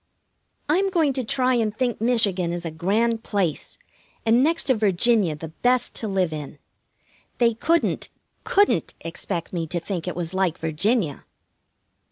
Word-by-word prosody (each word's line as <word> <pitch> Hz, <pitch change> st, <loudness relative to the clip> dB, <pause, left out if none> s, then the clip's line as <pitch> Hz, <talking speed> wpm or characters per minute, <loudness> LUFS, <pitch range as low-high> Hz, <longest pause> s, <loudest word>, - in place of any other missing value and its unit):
I'm 375 Hz, +6 st, +2 dB
going 325 Hz, -7 st, +2 dB
to 260 Hz, -1 st, -2 dB
try 255 Hz, +2 st, +1 dB
and 220 Hz, -3 st, 0 dB
think 245 Hz, -3 st, -1 dB
Michigan 205 Hz, -7 st, +2 dB
is 175 Hz, 0 st, -4 dB
a 165 Hz, -, -3 dB
grand 220 Hz, +8 st, 0 dB
place, 185 Hz, -8 st, -2 dB, 0.5 s
and 230 Hz, +3 st, +4 dB
next 325 Hz, +3 st, +2 dB
to 260 Hz, -, +3 dB
Virginia 210 Hz, -4 st, +2 dB
the 160 Hz, +1 st, -8 dB
best 245 Hz, +9 st, +1 dB
to 220 Hz, -, -2 dB
live 190 Hz, -5 st, 0 dB
in. 150 Hz, -1 st, -7 dB, 0.8 s
They 235 Hz, -1 st, +3 dB
couldn't, 330 Hz, +9 st, 0 dB, 0.3 s
couldn't 405 Hz, +1 st, +2 dB
expect 170 Hz, +1 st, -5 dB
me 165 Hz, -2 st, -2 dB
to 175 Hz, +2 st, -2 dB
think 180 Hz, 0 st, -5 dB
it 180 Hz, -, -3 dB
was 175 Hz, 0 st, -3 dB
like 185 Hz, -3 st, 0 dB
Virginia! 165 Hz, -, -1 dB
210 Hz, 155 wpm, -23 LUFS, 170-245 Hz, 0.8 s, and